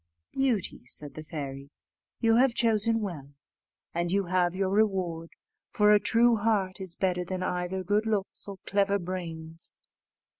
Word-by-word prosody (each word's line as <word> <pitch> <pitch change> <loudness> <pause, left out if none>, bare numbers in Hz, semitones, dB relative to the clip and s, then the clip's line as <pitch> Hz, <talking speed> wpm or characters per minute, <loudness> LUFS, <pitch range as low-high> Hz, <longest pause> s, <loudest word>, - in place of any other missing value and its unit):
"Beauty," 255 - -1
said 145 +3 -2
the 155 - -8
fairy, 140 -3 -6 0.5
"you 225 0 +4
have 250 -1 +4
chosen 225 0 +2
well, 145 -8 -6 0.6
and 170 0 -1
you 200 +1 +2
have 180 -1 +1
your 190 0 0
reward, 185 -6 0 0.4
for 210 -2 +4
a 210 - +6
true 230 +2 +4
heart 205 -3 0
is 185 -3 -4
better 180 -2 0
than 185 +1 -4
either 180 +1 -2
good 210 +4 +1
looks 205 -2 -2
or 200 -1 -7
clever 200 0 +2
brains. 165 -3 -6
190 Hz, 150 wpm, -28 LUFS, 170-210 Hz, 0.6 s, a